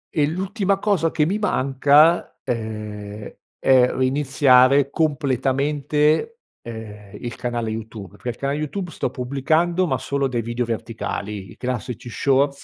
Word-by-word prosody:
e 150 -3 +3
l'ultima 195 +4 -1
cosa 195 -5 +1
che 155 -1 +1
mi 195 +6 -1
manca, 145 -2 +3
ehm, 105 -2 -5 0.2
è 130 -2 +4
reiniziare 135 0 +4
completamente, 150 - +1 0.2
ehm, 105 -3 -9
il 120 -1 -6
canale 120 -2 -3
YouTube, 110 -4 -7
pe 125 - -5
l 120 - -4
canale 140 +3 -2
YouTube 170 +4 -4
sto - - -2
pubblicando, 155 +7 0
ma - - 0
solo 140 -1 -1
dei 120 -3 -2
video 120 +1 -2
verticali, 105 -4 -4
i - - -14
classici 125 -1 -4
shorts 140 +2 +1
135 Hz, 135 wpm, -22 LUFS, 115-150 Hz, 0.2 s, è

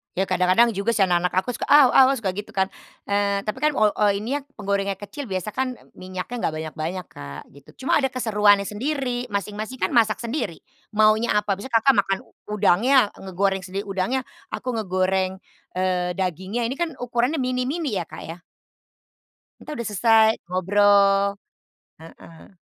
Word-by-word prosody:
Ya 190 - +1
kadang-kadang 185 +6 +4
juga 205 +3 -1
sih 200 - +4
anak-anak 180 -1 +1
aku - - -7
suka, - - -4
“Aw 285 -3 +7
aw,” 265 - +7
ah, - - -1
suka 205 -7 -2
gitu 205 +3 -7
kan, 190 0 +1 0.4
eee, 200 0 +1
tapi 215 - -4
kan 305 0 +2
ol 215 -3 +4
o 210 - 0
ini 225 +8 -2
ya, - - -14
penggorengan 200 -1 -1
kecil 265 +9 -8
biasa 190 +1 -3
kan, 255 +2 -2
e - - -20
minyaknya 185 +6 -6
nggak 155 - -3
banyak-banyak, 160 +3 -5
Kak, 70 0 -9
gitu. 140 - -16
Cuma - - +3
ada 270 - +2
keseruannya 210 -5 +3
sendiri. 250 +2 -2
Masing-masing 210 +4 -4
kan - - +1
masak 220 -4 +3
sendiri, 230 - -3 0.4
maunya 215 +2 +4
apa. 210 -1 +1
Misalnya 235 +4 -5
Kakak 270 +2 +4
makan 195 0 -1
u - - -24 0.3
udangnya, 215 +5 +4
ngegoreng 195 +1 -1
sendiri 195 +2 -5
udangnya. 195 +6 -1 0.3
Aku 255 - -3
ngegoreng, 190 -2 0 0.4
eee, 180 -1 0
dagingnya. 190 +5 -2
Ini 250 +4 -2
kan 345 -1 0
ukurannya 245 +5 -1
mini-mini 255 - -1
ya, 170 - -4
Kak, - - -9
ya. 165 +2 -7 1.2
Kita 305 - -8
sudah 235 -7 -4
selesai, 220 +2 +4 0.2
ngobrol. 200 +2 +3 0.7
Heeh. 165 +3 -15
205 Hz, 170 wpm, -23 LUFS, 185-240 Hz, 1.2 s, Aw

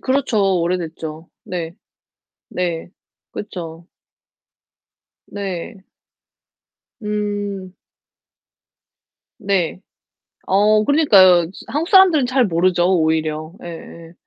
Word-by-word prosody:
그렇죠. 215 -9 +1
오래됐죠. 165 -2 -4 0.2
네. 175 -5 -5 0.8
네. 175 -2 -3 0.4
그렇죠. 170 -4 -8 1.4
네. 195 0 -6 1.2
음. 205 -2 -3 1.7
네. 190 -2 -1 0.7
어 210 +2 +3
그러니까요. 190 - +5 0.2
한국 320 +5 -2
사람들은 365 - +5
잘 255 0 +2
모르죠, 175 0 +1
오히려. 155 0 -1
예예. 170 -1 -10
185 Hz, 150 characters per minute, -19 LUFS, 170-210 Hz, 1.7 s, 그러니까요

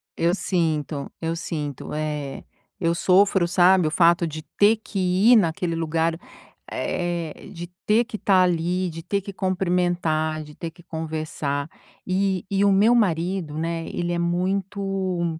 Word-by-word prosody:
eu 170 +3 +2
sinto, 155 -6 -1
eu 165 0 -2
sinto, 150 -5 -5
é. 150 -2 -4 0.4
Eu 170 -2 +1
sofro, 185 0 +3
sabe, 180 -1 +4
o - - -1
fato 170 0 +4
de 155 0 -6
ter 210 +2 +6
que 215 -2 -6 0.3
ir - - +9
naquele 170 -2 0
lugar, 165 +1 0 0.5
eh, 175 -3 -3
de 170 +1 -7 0.2
ter 220 +3 +4
que 225 -3 -6
tá 190 -3 +3
ali, 180 +1 0
de 165 0 -7
ter 200 +4 -1
que 200 - -7
cumprimentar, 175 -4 0
de 150 0 -13
ter 165 - -5
que 175 +1 -18
conversar. 155 -3 -3 0.4
E 190 -1 0
e 195 0 +2
o 200 - +5
meu 210 +5 +5
marido, 175 -6 0
né, 165 0 -2
ele 175 0 -3
é 170 - -1
muito 185 -1 -1
175 Hz, 150 wpm, -24 LUFS, 160-190 Hz, 0.5 s, ir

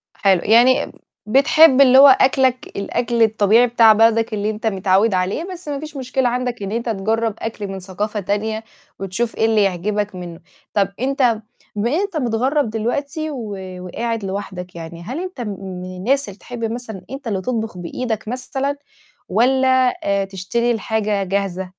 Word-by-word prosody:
حلو، 190 -3 +3
يعني 240 +4 +4 0.3
بتحب 280 +4 +5
اللي 260 -1 +7
هو 280 +1 +10
أكلك 260 -1 +3
الأكل 235 +3 0
الطبيعي 220 +2 +4
بتاع 225 -2 +6
بلدك 225 +1 +3
اللي 210 0 -1
أنت 220 +1 -3
متعوّد 195 +1 +2
عليه، 185 - -1
بس 350 -3 -10
ما 285 -1 -3
فيش 305 -1 -8
مشكلة 255 -1 0
عندك 245 -3 -3
إن 195 - -4
أنت 235 +1 -2
تجرب 220 +2 0
أكل 220 -2 -5
من 195 0 -6
ثقافة 205 +3 -4
تانية 215 +3 -2 0.4
وتشوف 195 +5 -2
إيه 220 - +2
اللي 220 -2 +3
يعجبك 200 +2 -1
منه. 175 -2 -8 0.3
طب 200 -2 +2
أنت 255 -4 +1 0.3
بما 210 +3 0
إن 340 - +2
أنت 400 -5 -3
متغرب 255 +2 0
دلوقتي 280 +8 -3
و 220 -7 -5 0.2
وقاعد 225 +4 -4
لوحدك 190 -2 -6
يعني، 170 0 -8
هل 255 - -5
أنت 365 -8 -7
م 235 - -4
من 185 -1 -7
الناس 255 +5 0
اللي 195 - -12
تحب 245 -2 -8
مثلًا 220 -6 -7
أنت 270 -2 -7
اللي 195 -3 -1
تطبخ 225 -3 -3
بإيدك 220 +5 -4
مثلًا 265 +3 -3 0.5
والّا 260 +4 +3 0.2
آآ 200 0 +1
تشتري 195 +5 -1
الحاجة 215 -2 -1
جاهزة؟ 190 -1 -2
225 Hz, 165 wpm, -20 LUFS, 195-255 Hz, 0.5 s, هو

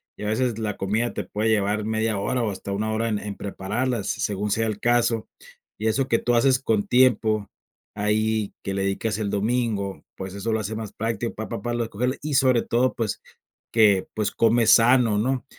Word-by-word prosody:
y - - -9
a - - -2
veces 115 +1 0
la 105 -2 -3
comida 110 +5 -1
te - - -3
puede 110 +2 -1
llevar 105 0 +1
media 110 -1 0
hora 125 +6 -1
o 110 - 0
hasta 100 +1 -6
1 110 +2 -1
hora 115 +1 0
en 105 - -1
en 105 -1 -6
prepararlas, 105 +4 -3
según 105 0 -2
sea 115 +1 +1
el 105 -1 -3
caso, 120 -1 +1 0.5
y 110 - -2
eso 130 +4 +1
que 115 - +2
tú 120 - 0
haces 130 +2 +4
con 110 -6 0
tiempo, 110 -4 +3 0.5
ahí 110 0 0
que 95 - -3
le 95 0 -1
dedicas 105 +2 -1
el 105 -2 -2
domingo, 105 -2 -1
pues 95 0 -7
eso 100 +3 -3
lo 110 - +1
hace 110 +2 -4
más 110 -2 -6
práctico 115 +1 -3
para 105 -2 -5
para 120 +1 -2
recoger 120 +3 -1
y 150 -1 -2
sobre 130 -3 +4
todo, 125 +2 +1
pues 115 -4 -2 0.5
que, 105 -4 +4
pues 105 -2 -1
comes 115 0 +3
sano 115 -2 +5
¿no? 130 +4 0
110 Hz, 200 wpm, -24 LUFS, 105-120 Hz, 0.5 s, sano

